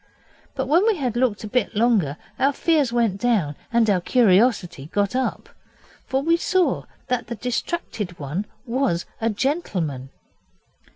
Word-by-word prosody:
But 265 - -1
when 335 +10 +3
we 445 - +4
had 255 - -2
looked 240 -4 +1
a - - -4
bit 230 0 -1
longer 205 - +2 0.2
our 275 +1 +3
fears 300 -5 +2
went 230 -5 +1
down 205 -12 +1 0.2
and 235 -1 +3
our 195 -4 +2
curiosity 200 - +3
got 200 +6 0
up. 260 0 -1 0.6
For 265 +1 0
we 335 +2 +3
saw 370 +1 +1 0.2
that 250 -2 -2
the 235 - -4
distracted 230 - -3
one 155 +8 -4 0.2
was 235 -8 0 0.2
a 225 - +2
gentleman. 190 - -2
235 Hz, 150 wpm, -23 LUFS, 195-265 Hz, 0.6 s, we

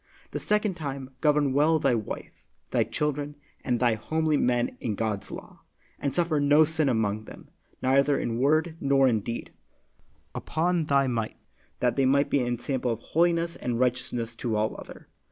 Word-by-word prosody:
The - - -3
second 210 -1 +1
time, 140 -5 -6
govern 150 -3 +3
well 155 +3 +4
thy 140 -4 +2
wife, 110 -3 -5 0.3
thy - - +3
children, 150 0 -2 0.3
and 125 -2 0
thy 120 -2 +3
homely 155 +8 0
men 120 -3 +1
in 110 -3 -2
God's 105 -2 -2
law, - - -10 0.4
and 140 -2 -2
suffer 170 -3 +1
no 145 +2 +5
sin 155 -2 +1
among 110 -3 0
them, - - -12 0.3
neither 140 +2 +3
in 115 0 -2
word 155 +4 +2
nor 135 -1 +4
in 115 -4 +2
deed, 115 +3 -5 0.8
upon 170 +1 0
thy 140 -1 +3
might, 115 -4 -2 0.4
that 125 0 +1
they 135 -1 +3
may 140 +2 +4
be 145 - 0
ensample 120 +1 -1
of 115 -2 -1
holiness 170 +2 +1
and 120 -1 -3
righteousness 125 -2 -1
to 115 -3 -2
all 105 +1 0
other. - - -11
135 Hz, 170 wpm, -27 LUFS, 120-150 Hz, 0.8 s, no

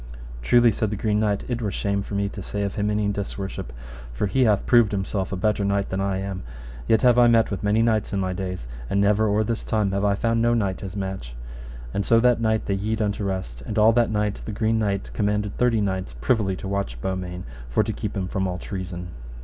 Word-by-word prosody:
Truly, 120 - +5
said 110 +1 -1
the 105 - -2
Green 105 0 0
Knight, 105 -2 +1
it 120 -1 -2
were 105 - -1
shame 100 +1 -1
for 100 - -6
me 100 0 +1
to 100 - -7
say 100 +2 -3
of 100 - -2
him 105 0 -1
any 105 0 +1
disworship, 100 -4 -4 0.4
for - - -1
he 130 +6 +2
hath 105 -3 +2
proved 120 -4 +4
himself 95 -1 -2
a - - -1
better 105 +2 +1
knight 100 0 0
than 95 +1 -2
I 100 -1 0
am, 95 -1 -4 0.5
yet 110 -1 +3
have 125 -1 +6
I 120 - +7
met 115 -2 +4
with 100 - -3
many 105 +2 +2
knights 110 -3 +1
in 100 - -1
my 95 -1 -1
days, 90 -8 -5 0.2
and 100 - +1
never 105 +2 +3
or 105 +1 +2
this 115 +1 -2
time 105 -3 0
have 100 +1 -1
I 100 -1 +3
found 115 +2 +1
no 120 0 +3
knight 100 -5 -1
his 100 -1 -6
match. 95 -12 -5 0.6
And 100 - 0
so 115 +3 +4
that 120 0 +3
night 110 -1 +1
they 100 - 0
yede 105 +3 -1
unto 105 -1 -1
rest, 95 -11 -4
and 105 - -5
all 110 +1 +6
that 120 0 +3
night 105 -1 -1
the - - -5
Green 110 +2 +1
Knight 100 -2 -1
commanded 105 -1 0
thirty 120 -3 +3
knights 95 -9 -2
privily 100 - +1
to 95 - -7
watch 100 -12 -2
Beaumains, 90 +3 -4 0.2
for - - +2
to - - -3
keep - - -4
him 95 -1 -2
from 95 0 -1
all 90 -1 -3
treason. 90 -2 -6
100 Hz, 240 wpm, -24 LUFS, 95-110 Hz, 0.6 s, I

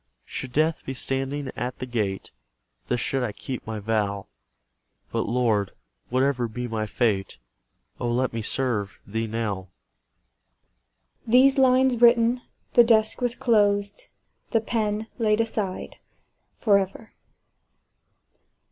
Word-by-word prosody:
Should 130 - -6
death 155 +4 +1
be 135 - -5
standing 135 +2 -2
at 125 +2 -4
the - - -5
gate, 105 -6 -3 0.6
Thus 125 - 0
should 135 0 -1
I 120 -4 -1
keep 125 +3 -6
my 110 0 -3
vow: 100 -2 -1 0.9
But, - - -1
Lord! 115 -5 +1 0.4
whatever 130 -1 +1
be 125 +2 -5
my 110 -2 -2
fate, 105 - 0 0.6
Oh, 120 - -1
let 125 +1 0
me 115 - -2
serve 105 -4 -1
Thee 110 +3 -2
now! 105 -4 -3 1.6
These 265 +4 +5
lines 255 -2 +4
written, 235 +1 +5 0.3
the 240 - +8
desk 220 0 +3
was 245 -1 0
closed, 205 - +1 0.4
the 225 - +3
pen 220 -1 -1
laid 215 -1 +2
aside 215 -4 -2 0.6
for 205 -3 +4
ever. 195 +3 -6
135 Hz, 120 wpm, -25 LUFS, -, 1.6 s, the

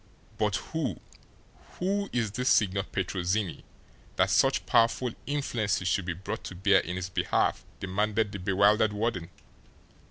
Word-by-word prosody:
"But 105 -2 +1
who 160 +5 -3 0.8
who 200 +2 -1
is 115 -4 0
this 125 +4 0
Signor 100 -2 +3
Petrozinni, 95 0 -2 0.5
that - - +2
such - - +3
powerful 115 +2 +3 0.2
influences 120 -10 -1
should 90 +1 +1
be 90 - -2
brought 95 +4 -6
to 95 - -7
bear 95 +1 +4
in 90 +1 -4
his 90 +1 -4
behalf?" - - +1 0.2
demanded 105 +3 0
the 100 - -6
bewildered 100 +3 +3
warden. 105 -5 -2
100 Hz, 135 wpm, -28 LUFS, 95-115 Hz, 0.8 s, bear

